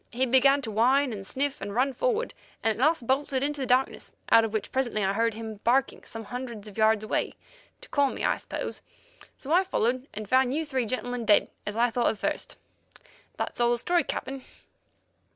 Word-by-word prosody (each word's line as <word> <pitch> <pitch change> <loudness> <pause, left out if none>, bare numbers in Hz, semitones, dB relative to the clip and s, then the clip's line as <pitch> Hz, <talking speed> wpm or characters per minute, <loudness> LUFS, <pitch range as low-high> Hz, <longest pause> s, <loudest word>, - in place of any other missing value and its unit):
He 255 +2 +1
began 275 +3 +4
to 225 - -4
whine 255 +4 +3
and 195 -2 -7
sniff 275 +1 -2
and 200 +1 -5
run 265 +3 +2
forward, - - -1 0.3
and 225 - +3
at 225 +4 -2
last 310 -4 +2
bolted 265 +1 0
into 290 0 -2
the 260 - -2
darkness, 255 +2 +1 0.2
out 225 - +7
of 225 - -2
which 215 -2 -3
presently 240 -5 0
I 195 0 +1
heard 230 +1 +1
him 220 -1 -6
barking 250 +6 +1
some 225 0 -7
hundreds 235 -2 -6
of 205 - -11
yards 220 -1 +3
away, 215 - -1 0.5
to - - -13
call 285 -2 +2
me, - - -4
I - - +2
suppose. - - -5 0.6
So 295 +3 -3
I 365 +2 +5
followed 255 -7 -1
and 215 0 -7
found 260 +3 +3
you 320 +1 -1
three 260 -5 -1
gentlemen, 245 0 -3
dead, 210 -2 +4 0.2
as 210 +1 -3
I 240 +1 +3
thought 240 +1 +2
at 220 - -2
first. - - -3 0.8
That's - - -3
all 240 - +4
the 240 - +2
story, 345 +7 +1
Captain." 270 0 -5
245 Hz, 205 wpm, -27 LUFS, 220-270 Hz, 0.8 s, out